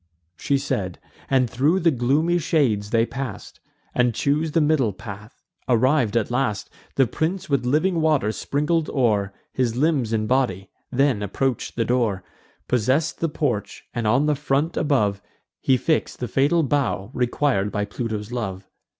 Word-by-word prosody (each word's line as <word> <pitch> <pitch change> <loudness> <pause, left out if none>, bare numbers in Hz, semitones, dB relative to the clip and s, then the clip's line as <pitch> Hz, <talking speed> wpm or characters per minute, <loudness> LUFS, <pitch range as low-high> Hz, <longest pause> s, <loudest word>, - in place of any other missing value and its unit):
She 140 +10 0
said, 100 -10 -2 0.3
and 130 -2 +3
thro' 140 +10 +2
the 170 -3 +3
gloomy 145 +7 +2
shades 125 -11 +1
they 115 0 +3
pass'd, 125 -6 -6 0.3
And 125 -2 +2
chose 150 +2 0
the - - +4
middle 145 -8 +2
path. 105 +4 -10 0.3
Arriv'd 125 -1 +3
at 115 0 0
last, 125 -4 -1 0.2
The 135 - +4
prince 165 - -2
with 130 -3 +1
living 160 +6 +2
water 150 -9 +2
sprinkled 150 +7 -1
o'er 105 -7 +1 0.2
His 120 -3 0
limbs 140 -4 +1
and 110 -1 0
body; 110 -7 0 0.2
then 135 -4 +2
approach'd 120 +5 -2
the 115 - 0
door, 115 -6 0 0.4
Possess'd 130 +7 +1
the 165 - 0
porch, 135 -9 -2
and 115 -2 -1
on 125 +7 +3
the 150 - +3
front 145 +3 0
above 105 -9 +1 0.4
He 130 - +3
fix'd 160 +4 -1
the 125 - -2
fatal 145 +7 +2
bough 130 -7 -1
requir'd 125 -4 0
by 105 -1 -1
Pluto's 105 0 -4
love. 95 -6 -4
130 Hz, 155 wpm, -23 LUFS, 110-150 Hz, 0.4 s, the